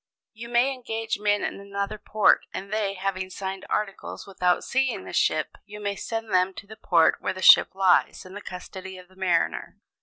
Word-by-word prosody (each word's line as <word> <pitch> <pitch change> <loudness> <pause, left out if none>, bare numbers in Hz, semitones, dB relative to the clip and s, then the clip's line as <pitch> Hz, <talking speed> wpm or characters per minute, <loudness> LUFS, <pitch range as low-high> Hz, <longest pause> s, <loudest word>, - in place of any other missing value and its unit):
"You 230 +1 -9
may 240 +3 +3
engage 225 -4 -4
men 205 0 +1
in - - -3
another 200 +1 -4
port, 215 0 +3
and 195 +2 -6
they, 205 -2 -1
having 190 0 -3
signed 190 0 -6
articles 205 -2 -3
without 180 -2 0
seeing 265 -1 0
the - - -9
ship, - - 0
you 210 0 -11
may 200 -1 -2
send 225 0 -5
them 185 +1 +2
to - - -9
the 215 +2 -11
port 170 -6 +3
where - - -1
the 185 0 -7
ship - - +7
lies 190 -1 +2
in 185 - -11
the 205 - -7
custody 190 0 -8
of 180 0 -14
a - - -21
mariner. 180 -3 -1
200 Hz, 195 wpm, -25 LUFS, 185-215 Hz, -, ship